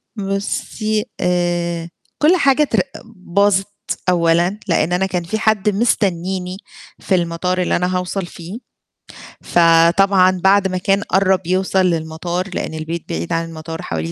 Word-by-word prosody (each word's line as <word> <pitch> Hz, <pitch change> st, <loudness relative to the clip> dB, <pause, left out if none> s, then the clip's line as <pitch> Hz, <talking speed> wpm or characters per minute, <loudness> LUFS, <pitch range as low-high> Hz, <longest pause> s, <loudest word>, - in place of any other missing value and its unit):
بُصي 210 Hz, +1 st, -2 dB, 0.2 s
آآ 175 Hz, -1 st, 0 dB, 0.3 s
كل 325 Hz, +5 st, +5 dB
حاجة 280 Hz, -3 st, +3 dB
تر 295 Hz, -, +1 dB, 0.3 s
باظِت 200 Hz, -1 st, 0 dB, 0.4 s
أولًا، 175 Hz, +3 st, +2 dB
لأن 170 Hz, -1 st, +1 dB
أنا 185 Hz, +2 st, +1 dB
كان 180 Hz, -2 st, -2 dB
فيه 200 Hz, +6 st, -3 dB
حد 215 Hz, -1 st, +2 dB
مستنيني 190 Hz, -4 st, -1 dB, 0.4 s
في 190 Hz, -, 0 dB
المطار 180 Hz, +1 st, -1 dB
اللي 180 Hz, -, +1 dB
أنا 180 Hz, +1 st, 0 dB
هاوصَل 180 Hz, +1 st, -3 dB
فيه، 175 Hz, +4 st, -9 dB, 0.8 s
فطبعًا 180 Hz, +3 st, +4 dB
بعد 195 Hz, 0 st, +4 dB
ما 185 Hz, -1 st, -3 dB
كان 195 Hz, +2 st, +1 dB
قرَّب 190 Hz, -2 st, +1 dB
يوصَل 190 Hz, 0 st, +1 dB
للمطار، 170 Hz, +2 st, -2 dB
لأن -, -, -4 dB
البيت 160 Hz, +1 st, -5 dB
بعيد 85 Hz, +1 st, -3 dB
عن 165 Hz, 0 st, 0 dB
المطار 160 Hz, 0 st, -7 dB
حوالي 80 Hz, 0 st, -4 dB
180 Hz, 135 wpm, -18 LUFS, 170-195 Hz, 0.8 s, كل